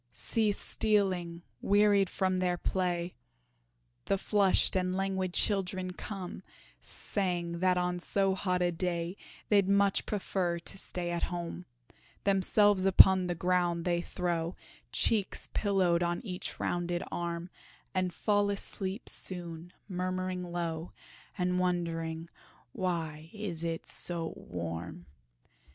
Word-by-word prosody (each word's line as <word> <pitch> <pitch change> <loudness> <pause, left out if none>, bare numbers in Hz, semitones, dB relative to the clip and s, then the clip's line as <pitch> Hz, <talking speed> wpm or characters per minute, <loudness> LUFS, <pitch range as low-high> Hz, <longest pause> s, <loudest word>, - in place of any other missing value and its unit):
See 215 - +1
stealing, 185 -5 0 0.2
wearied 205 -2 +4
from 185 -1 0
their 180 -1 +1
play, 175 -1 -1 0.9
The 195 - +2
flushed 200 -1 +3
and 185 0 +1
languid 190 -1 -1
children 185 -2 +1
come, 190 -1 -6 0.4
Saying 170 - -2
that 185 0 +3
on 180 0 0
so 195 +2 +1
hot 180 -1 0
a 175 - +2
day 170 0 -2 0.3
They'd 200 -2 +4
much 200 0 +3
prefer 185 -4 -1
to 170 +3 -5
stay 175 -2 -3
at 170 - -1
home. 175 0 -5 0.6
Themselves 200 0 +4
upon 190 -1 +7
the 175 - -1
ground 175 -1 +1
they 175 -1 +1
throw, 175 -1 -2 0.4
Cheeks 210 -4 0
pillowed 185 -4 +2
on 175 +3 -1
each 180 -3 -5
rounded 175 0 -1
arm 170 +1 -3 0.4
And 185 -1 0
fall 205 +2 +2
asleep 195 +1 -3
soon, 175 -2 -6 0.2
murmuring 185 -1 -2
low, 170 -1 -3 0.4
And 180 -1 +1
wondering 165 -2 -1 0.4
"why 165 -4 -3
it 210 -4 -4
is 165 -1 -1
so 170 -2 -1
warm?" 85 0 -6
180 Hz, 120 wpm, -31 LUFS, 170-195 Hz, 0.9 s, upon